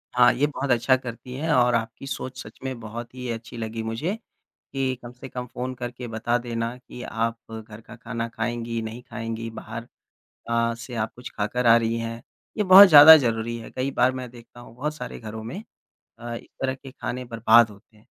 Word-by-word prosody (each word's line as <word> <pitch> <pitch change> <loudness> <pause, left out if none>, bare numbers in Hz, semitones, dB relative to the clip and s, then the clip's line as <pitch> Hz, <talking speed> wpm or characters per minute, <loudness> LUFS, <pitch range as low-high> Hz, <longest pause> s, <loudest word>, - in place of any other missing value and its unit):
हाँ, 120 0 +7
ये 140 +4 +1
बहुत 140 -2 -3
अच्छा 125 +2 +4
करती 125 0 -8
हैं 155 +4 -2
और 125 -1 +4
आपकी 115 +4 -3
सोच 130 -1 -5
सच - - -12
में 130 -2 -4
बहुत 115 +2 -8
ही 125 -1 -6
अच्छी 115 +1 -7
लगी 115 0 -4
मुझे 120 - -2 0.6
कि 130 -1 -1
कम 120 - -8
से 125 +1 -11
कम 125 -1 -5
फ़ोन 125 +2 -5
करके 120 0 -6
बता 115 +2 0
देना 120 0 -3
की 125 -1 -12
आप 115 0 -2 0.2
घर 110 0 -9
का 120 - -13
खाना 115 -1 -4
खाएँगी 115 0 -3
नहीं 110 +2 -6
खाएँगी 115 -1 -5
बाहर 115 +1 -8 0.6
अ, 115 0 +1
से 120 +2 -9
आप 110 -1 -2
कुछ 125 +1 -8
खा 105 - 0
कर 125 +2 -2
आ 115 0 +8
रही 115 0 0
हैं। 115 0 -5 0.3
ये 210 - +1
बहुत 190 +1 +10
ज़्यादा 155 0 +11
ज़रूरी 115 -3 -1
है 115 - -10
कई 130 +2 -2
बार 130 0 +2
मैं 130 -1 -6
देखता 120 0 -15
हूँ 120 - -14
बहुत 150 +4 -3
सारे 125 -4 -7
घरों 110 0 -7
में 165 - -6 0.6
अ, 120 0 -6
इस - - -10
तरह 130 0 0
के 135 0 -12
खाने 125 -1 -5
बर्बाद 115 -1 +5
होते 105 +1 -18
हैं। 105 - -24
120 Hz, 210 wpm, -24 LUFS, 115-130 Hz, 0.6 s, ज़्यादा